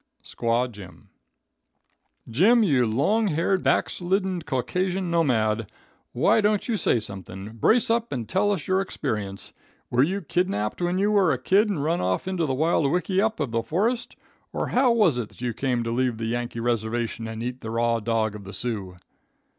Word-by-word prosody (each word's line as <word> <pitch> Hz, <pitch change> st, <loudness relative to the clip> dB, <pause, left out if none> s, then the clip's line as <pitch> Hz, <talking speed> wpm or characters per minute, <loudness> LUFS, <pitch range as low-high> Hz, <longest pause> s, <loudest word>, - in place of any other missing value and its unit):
Squaw 120 Hz, +1 st, 0 dB
Jim. 100 Hz, -4 st, -13 dB, 1.2 s
"Jim, 205 Hz, -, +4 dB
you 135 Hz, -, +3 dB
long 205 Hz, -, +2 dB
haired, 180 Hz, +3 st, +1 dB
backslidden 185 Hz, 0 st, 0 dB
Caucasian 175 Hz, +7 st, -2 dB
nomad, 115 Hz, -, +1 dB, 0.4 s
why -, -, +3 dB
don't 210 Hz, -1 st, +1 dB
you 235 Hz, -, 0 dB
say 125 Hz, -, +2 dB
something? 95 Hz, -1 st, -8 dB
Brace 165 Hz, -, +2 dB
up 235 Hz, 0 st, 0 dB
and 120 Hz, -5 st, -3 dB
tell 205 Hz, +2 st, +1 dB
us 185 Hz, -7 st, -2 dB
your 185 Hz, +1 st, +2 dB
experience. 105 Hz, -, -4 dB, 0.4 s
Were 125 Hz, -, +3 dB
you 190 Hz, +8 st, +1 dB
kidnapped 175 Hz, -, -1 dB
when 175 Hz, +1 st, 0 dB
you 205 Hz, +2 st, +2 dB
were 195 Hz, -5 st, +4 dB
a 130 Hz, -, +1 dB
kid 195 Hz, -, +3 dB
and 165 Hz, -9 st, -1 dB
run 165 Hz, +3 st, 0 dB
off 90 Hz, -, -1 dB
into 180 Hz, -4 st, -1 dB
the 135 Hz, -, 0 dB
wild 155 Hz, -1 st, +2 dB
wickyup 195 Hz, +4 st, 0 dB
of 140 Hz, -6 st, -2 dB
the 115 Hz, 0 st, 0 dB
forest, 220 Hz, -, -1 dB, 0.4 s
or -, -, -2 dB
how 255 Hz, 0 st, +3 dB
was 200 Hz, -, +3 dB
it 115 Hz, -, -4 dB
that -, -, -17 dB
you 120 Hz, -2 st, -1 dB
came 125 Hz, -1 st, -1 dB
to 115 Hz, -, -3 dB
leave 125 Hz, -1 st, 0 dB
the 115 Hz, -, -4 dB
Yankee 120 Hz, +1 st, -3 dB
reservation 115 Hz, 0 st, -2 dB
and 110 Hz, 0 st, -5 dB
eat 125 Hz, +1 st, -5 dB
the 110 Hz, -, -6 dB
raw 115 Hz, 0 st, +1 dB
dog 110 Hz, -1 st, 0 dB
of 105 Hz, -1 st, -9 dB
the 95 Hz, +1 st, -9 dB
Sioux?" 100 Hz, -4 st, -4 dB
130 Hz, 180 wpm, -25 LUFS, 115-190 Hz, 1.2 s, Jim